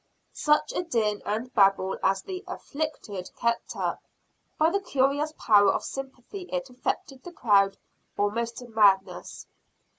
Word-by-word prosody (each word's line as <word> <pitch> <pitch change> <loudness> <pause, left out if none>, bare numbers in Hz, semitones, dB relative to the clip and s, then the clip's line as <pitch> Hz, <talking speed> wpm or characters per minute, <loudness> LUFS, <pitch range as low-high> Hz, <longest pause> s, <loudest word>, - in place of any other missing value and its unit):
Such 300 0 +2
a - - 0
din 220 -11 0
and 225 +5 -2
babel 195 -3 +3
as 195 0 +1
the 370 -1 -6
"afflicted" 280 - -5
kept 235 0 -1
up! - - -2 0.6
By 315 +2 +4
the 400 - +1
curious 285 -2 +1
power 205 -3 +5
of - - -2
sympathy 270 - -7
it 270 -1 -3
affected 255 +1 -3
the 355 - -9
crowd 200 - +3 0.4
almost 230 +3 -1
to 245 - -8
madness. 200 -4 +2
240 Hz, 140 wpm, -27 LUFS, 205-285 Hz, 0.6 s, power